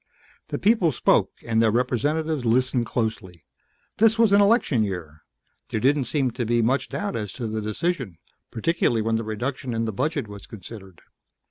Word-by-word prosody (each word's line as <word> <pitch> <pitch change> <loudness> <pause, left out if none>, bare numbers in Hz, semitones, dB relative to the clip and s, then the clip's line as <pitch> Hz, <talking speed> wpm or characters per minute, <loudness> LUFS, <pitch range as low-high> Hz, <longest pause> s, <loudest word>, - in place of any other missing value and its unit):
The - - -3
people 200 -6 +3
spoke 125 - +2 0.2
and 115 -1 +2
their 115 - +4
representatives 140 +6 0
listened 125 +1 +1
closely. 110 -9 -3 0.5
This 225 +1 +4
was 225 -3 +4
an 200 +1 +6
election 200 - +3
year. 85 -6 -5 0.5
There - - -1
didn't 135 +3 +2
seem 135 0 0
to 120 +1 -3
be 120 0 +1
much 130 +3 +1
doubt 205 -1 -3
as 105 -3 -3
to 125 - -5
the 110 0 -3
decision, 115 - -2 0.3
particularly 120 -3 0
when 115 0 +1
the 115 - -3
reduction 125 +4 -4
in 115 0 0
the 110 - -3
budget 145 - -1
was 100 -1 -10
considered. 95 -3 -11
120 Hz, 170 wpm, -24 LUFS, 110-150 Hz, 0.5 s, an